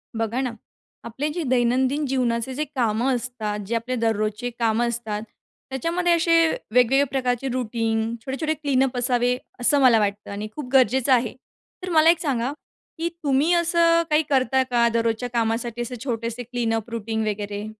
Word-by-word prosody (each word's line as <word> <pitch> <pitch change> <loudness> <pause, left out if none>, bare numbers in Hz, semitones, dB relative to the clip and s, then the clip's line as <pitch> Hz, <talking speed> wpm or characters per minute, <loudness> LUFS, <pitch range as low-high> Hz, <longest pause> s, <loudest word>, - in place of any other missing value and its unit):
बघा 225 +3 -1
ना, 255 -3 -2 0.5
आपले 250 +6 -3
जे 345 0 -3
दैनंदिन 260 +3 +1
जीवनाचे 250 -1 -1
जे 295 +4 -2
कामं 245 +1 +1
असतात, 225 -4 -4
जे 230 - -1
आपले 240 +3 -2
दररोजचे 220 0 -1
कामं 230 +1 +2
असतात, 220 -3 -4 0.5
त्याच्यामध्ये 335 +7 0
असे 335 0 +3 0.4
वेगवेगळे 250 +3 +4
प्रकारचे 255 -1 -1
रूटीन, 225 -2 -1 0.2
छोटे-छोटे 305 +4 -1
क्लीनअप 270 -4 0
असावे, 245 0 +1 0.2
असं 280 +4 +3
मला 245 -4 +6
वाटतं 205 0 -2
आणि 205 +1 -5
खूप 285 -5 -6
गरजेचं 260 +1 +3
आहे. 240 -2 +1 0.5
तर 365 - -4
मला 320 0 +5
एक 335 -1 +4
सांगा, 260 -4 -1 0.5
की 335 +1 -1
तुम्ही 285 +4 +2
असं 335 -1 +3
काही 305 +1 +3
करता 265 -1 +2
का, 240 -2 +2
दररोजच्या 230 +1 0
कामासाठी 235 0 -1
असे 245 +1 -4
छोटेसे 235 -1 -3
क्लीनअप 230 -2 -2
रूटीन 220 -1 -3
वगैरे? 205 0 -3
245 Hz, 155 wpm, -23 LUFS, 230-270 Hz, 0.5 s, मला